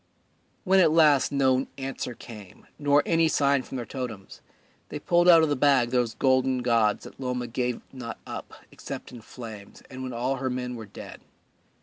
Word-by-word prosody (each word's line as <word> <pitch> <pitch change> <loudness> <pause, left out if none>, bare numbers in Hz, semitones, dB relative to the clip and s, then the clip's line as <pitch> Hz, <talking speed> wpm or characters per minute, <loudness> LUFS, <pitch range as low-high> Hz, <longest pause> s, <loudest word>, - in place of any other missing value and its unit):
When 190 -1 +4
at 165 -4 +5
last 150 -4 +4
no 135 -2 +2
answer 135 -2 -5
came 105 -7 -12
nor 145 0 +3
any 165 -1 +3
sign 140 -3 +2
from 130 - -7
their 120 - -4
totems, 115 -6 -7 0.5
they - - -5
pulled 175 +4 +3
out 165 -2 +8
of 160 - +2
the 145 - +1
bag 130 -3 +3
those 120 -3 0
golden 130 -1 +2
gods 115 -4 +2
that - - -13
Loma 125 -2 -3
gave 125 +1 -2
not 125 -3 -7
up - - -7 0.2
except - - -8
in 120 -2 -10
flames 110 -3 -11
and 130 0 -8
when 130 0 -5
all 125 +3 -2
her 130 0 -2
men 125 0 -4
were 110 -2 -8
dead. 100 - -11
130 Hz, 185 wpm, -26 LUFS, 120-140 Hz, 0.5 s, out